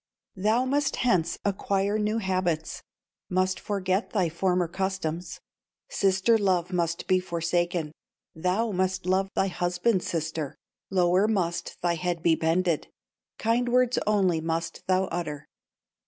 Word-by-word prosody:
"Thou 215 Hz, +6 st, +2 dB
must 280 Hz, +2 st, +1 dB
hence 185 Hz, -10 st, +1 dB
acquire 200 Hz, +1 st, 0 dB
new 210 Hz, +1 st, 0 dB
habits 185 Hz, -6 st, -1 dB, 0.5 s
Must 185 Hz, 0 st, +1 dB
forget 195 Hz, 0 st, -1 dB
thy 185 Hz, -6 st, +1 dB
former 180 Hz, +1 st, +1 dB
customs, 180 Hz, -2 st, -3 dB, 0.5 s
Sister 195 Hz, +4 st, +3 dB
love 185 Hz, -3 st, +1 dB
must 170 Hz, -1 st, -1 dB
be 185 Hz, 0 st, +3 dB
forsaken, 170 Hz, -2 st, -1 dB, 0.4 s
Thou 185 Hz, +7 st, 0 dB
must 185 Hz, -1 st, -1 dB
love 190 Hz, +1 st, +1 dB
thy -, -, +3 dB
husband's 180 Hz, +2 st, 0 dB
sister, 160 Hz, -3 st, -3 dB, 0.3 s
Lower 185 Hz, +1 st, +3 dB
must 180 Hz, -6 st, -1 dB
thy 175 Hz, -1 st, +2 dB
head 175 Hz, 0 st, -2 dB
be 165 Hz, -, +5 dB
bended, 165 Hz, +1 st, +1 dB, 0.5 s
Kind 235 Hz, +2 st, +1 dB
words 250 Hz, 0 st, +3 dB
only 190 Hz, -6 st, +2 dB
must 165 Hz, +1 st, -3 dB
thou 185 Hz, 0 st, +3 dB
utter. 155 Hz, -4 st, -4 dB
185 Hz, 125 wpm, -27 LUFS, 170-195 Hz, 0.5 s, be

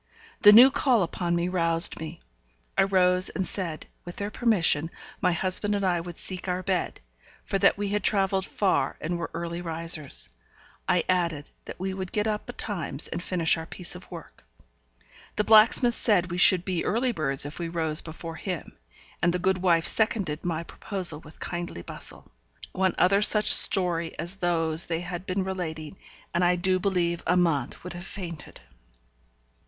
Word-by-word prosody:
The 205 Hz, -, +9 dB
new 245 Hz, +5 st, +8 dB
call 250 Hz, -7 st, +2 dB
upon 170 Hz, 0 st, -2 dB
me 170 Hz, +1 st, -1 dB
roused 165 Hz, -2 st, +1 dB
me. 160 Hz, +1 st, -8 dB, 0.5 s
I -, -, +3 dB
rose 185 Hz, -1 st, +3 dB
and 190 Hz, -, -3 dB
said, 170 Hz, -6 st, -4 dB, 0.2 s
with 175 Hz, -, -10 dB
their 205 Hz, +1 st, -5 dB
permission 170 Hz, -10 st, +2 dB, 0.3 s
my -, -, +2 dB
husband 185 Hz, +4 st, +1 dB
and 200 Hz, -1 st, -2 dB
I 175 Hz, -2 st, 0 dB
would 175 Hz, 0 st, -9 dB
seek 185 Hz, 0 st, -3 dB
our 180 Hz, 0 st, -2 dB
bed, 185 Hz, -2 st, -2 dB, 0.5 s
for 195 Hz, -, -2 dB
that 200 Hz, +1 st, +3 dB
we 205 Hz, 0 st, -3 dB
had 205 Hz, 0 st, -2 dB
travelled 195 Hz, -2 st, +1 dB
far 195 Hz, -3 st, -1 dB
and 170 Hz, +2 st, -4 dB
were 165 Hz, -, -5 dB
early 170 Hz, 0 st, -5 dB
risers. 165 Hz, -3 st, -2 dB, 0.6 s
I 180 Hz, -1 st, +2 dB
added 170 Hz, -5 st, -1 dB
that -, -, -10 dB
we 190 Hz, +1 st, -3 dB
would 190 Hz, -1 st, -6 dB
get 210 Hz, +1 st, +1 dB
up 210 Hz, -1 st, -3 dB
betimes, 175 Hz, -, -1 dB
and 170 Hz, -, -5 dB
finish 170 Hz, -3 st, +1 dB
our 160 Hz, 0 st, -7 dB
piece 180 Hz, -1 st, 0 dB
of 180 Hz, +1 st, -10 dB
work. 170 Hz, -3 st, -12 dB, 0.9 s
The 210 Hz, -, 0 dB
blacksmith 225 Hz, +3 st, +5 dB
said 185 Hz, -7 st, +1 dB
we 175 Hz, -, -3 dB
should 180 Hz, 0 st, +5 dB
be 185 Hz, -3 st, -2 dB
early 245 Hz, +3 st, 0 dB
birds 140 Hz, -, +1 dB
if 145 Hz, +3 st, -8 dB
we 170 Hz, -1 st, -4 dB
rose 160 Hz, -2 st, -1 dB
before 165 Hz, 0 st, -9 dB
him; 180 Hz, -3 st, -6 dB, 0.5 s
and 175 Hz, -, +2 dB
the 180 Hz, -, -1 dB
good 185 Hz, +1 st, 0 dB
wife 170 Hz, -2 st, +2 dB
seconded 200 Hz, -8 st, 0 dB
my 165 Hz, -2 st, -3 dB
proposal 180 Hz, -3 st, -2 dB
with 155 Hz, 0 st, -17 dB
kindly 175 Hz, -, -6 dB
bustle. -, -, -8 dB, 0.4 s
One 190 Hz, -1 st, 0 dB
other 195 Hz, +3 st, +3 dB
such 210 Hz, 0 st, +5 dB
story 170 Hz, -4 st, +5 dB
as 175 Hz, +3 st, -3 dB
those 165 Hz, -3 st, +3 dB
they 165 Hz, 0 st, -3 dB
had 175 Hz, +1 st, -7 dB
been 185 Hz, +1 st, -1 dB
relating, 175 Hz, -3 st, -6 dB, 0.4 s
and 170 Hz, +1 st, +1 dB
I 175 Hz, 0 st, +3 dB
do 185 Hz, +1 st, +1 dB
believe 175 Hz, -3 st, -1 dB
Amante 165 Hz, -7 st, 0 dB
would 180 Hz, -, -7 dB
have 175 Hz, +1 st, -8 dB
fainted. 170 Hz, -6 st, -9 dB
180 Hz, 175 wpm, -26 LUFS, 165-195 Hz, 0.9 s, The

